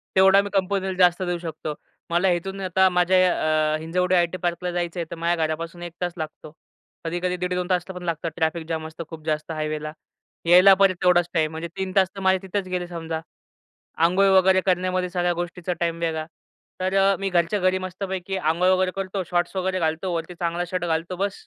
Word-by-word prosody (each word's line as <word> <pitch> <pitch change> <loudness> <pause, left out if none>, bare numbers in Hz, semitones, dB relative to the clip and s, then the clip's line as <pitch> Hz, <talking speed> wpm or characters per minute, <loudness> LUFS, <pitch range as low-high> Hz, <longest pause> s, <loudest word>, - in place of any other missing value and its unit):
तेवढा 190 +1 +6
मी 200 - -5
कंपनीला 190 0 0
जास्त 180 0 +4
देऊ 175 -1 -1
शकतो. 160 -2 -5 0.4
मला 175 +3 +3
इथून 190 +3 -3
आता 190 0 +3
माझ्या 180 +1 +3 0.6
अ, - - -1
हिंजवडी 180 +3 0
आयटी 175 0 +1
पार्कला 175 +1 -1
जायचं 175 0 -3
आहे 170 - -2
तर - - -4
माझ्या 170 -1 0
घरापासून 165 +2 -5
1 175 -1 -7
तास 175 -1 -1
लागतो. 155 -1 -7 0.5
कधी-कधी 175 +2 -1
1:30-2 180 0 -1
तासला 180 0 -1
पण 180 - -8
लागतं 165 -1 -2
ट्रॅफिक 160 0 -1
जाम 160 -1 -3
असतं 160 +1 -8
खूप 160 -2 -9
जास्त 155 0 -2
हायवेला. 155 -1 -3 0.5
यायला 180 +3 +8
परत 195 -1 +5
तेवढाच 175 -1 +4
टाईम. 155 -2 +1
म्हणजे 160 +1 -5
3 190 -1 -2
तास 190 -1 +5
तर - - -6
माझे 190 0 +3
तिथेच 190 0 -3
गेले 180 -1 -3
समजा. 165 -2 -5 0.8
अंघोळ 185 +4 +4
वगैरे 190 0 +4
करण्यामध्ये 185 0 +1
सगळ्या 175 -1 0
गोष्टीचा 175 +1 -4
टाईम 170 -1 -1
वेगळा. 160 -2 -2 0.5
तर 185 +1 -1
अ, 195 0 +4
मी 195 - 0
घरच्या 175 +3 +1
घरी 185 0 +2
मस्तपैकी 185 0 -4
अंघोळ 175 +1 +1
वगैरे 185 0 +2
करतो 195 0 -3
शॉर्ट्स 175 +1 0
वगैरे 185 0 0
घालतो 165 +2 -1
वरती 170 +2 -4
चांगला 170 0 -2
शर्ट 185 -1 -2
घालतो 170 +2 -2
बस. 200 +2 -3
175 Hz, 195 wpm, -24 LUFS, 165-185 Hz, 0.8 s, यायला